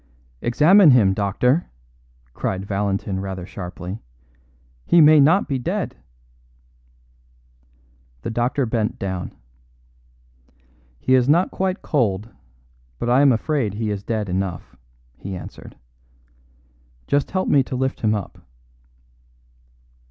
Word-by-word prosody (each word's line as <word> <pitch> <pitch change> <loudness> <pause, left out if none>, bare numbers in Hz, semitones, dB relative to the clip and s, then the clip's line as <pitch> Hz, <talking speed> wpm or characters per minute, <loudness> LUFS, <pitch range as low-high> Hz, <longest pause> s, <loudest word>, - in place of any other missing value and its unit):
"Examine 165 +9 +5
him, 110 -8 +5
doctor," 115 - 0 0.6
cried 95 0 -3
Valentin 100 -1 -2
rather 95 -2 -5
sharply. 90 +1 -7 0.9
"He 170 - +5
may 155 -1 +7
not 160 +8 +4
be 135 -3 -2
dead." 125 - -3 2.3
The - - -3
doctor 120 +4 0
bent 110 -1 -2
down. 95 -2 -4 1.7
"He 130 - +1
is 130 0 +3
not 170 +5 +3
quite 190 +1 -2
cold, 110 -6 -1 0.7
but 120 - -2
I 130 +3 +5
am 140 -2 +6
afraid 120 -3 -1
he 110 0 -2
is 100 -1 -4
dead 110 0 -3
enough," 90 -8 -4 0.4
he 95 0 -6
answered. 90 - -11 1.3
"Just 140 -1 0
help 185 0 -1
me 140 - +4
to 130 - -5
lift 130 +1 -2
him 110 -1 +2
up." 100 -4 -6
115 Hz, 115 wpm, -21 LUFS, 95-140 Hz, 2.3 s, may